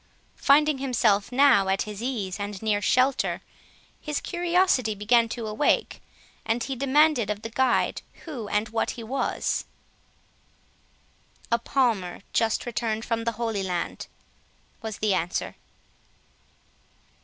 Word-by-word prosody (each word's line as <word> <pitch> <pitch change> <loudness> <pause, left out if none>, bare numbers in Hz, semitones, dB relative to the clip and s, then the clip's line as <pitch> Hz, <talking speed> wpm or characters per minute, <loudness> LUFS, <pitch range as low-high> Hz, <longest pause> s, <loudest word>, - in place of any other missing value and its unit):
Finding 295 0 +4
himself 230 -6 +1
now 250 -7 +5
at 190 0 +1
his 210 0 -7
ease 215 -7 -3
and 205 -1 -4
near 210 -2 +1
shelter, 255 +5 +2 0.6
his 300 -2 -2
curiosity 345 - +1
began 230 +3 +3
to 230 0 -5
awake, 215 +7 0 0.4
and 230 +1 -1
he 270 - -3
demanded 275 -3 +3
of 210 0 -3
the 225 - -6
guide 260 +1 +1 0.2
who 260 -10 -6
and 210 +2 0
what 225 +2 -2
he 235 - -6
was. 260 +5 -1 1.9
"A 235 - +3
Palmer, 230 -9 0
just 225 -1 +1
returned 225 -2 -2
from 230 -1 -2
the 230 - 0
Holy 225 -2 -2
Land," 180 -2 -3 0.7
was 220 -2 -5
the 210 -2 +1
answer. 175 0 -2
230 Hz, 125 wpm, -26 LUFS, 210-265 Hz, 1.9 s, now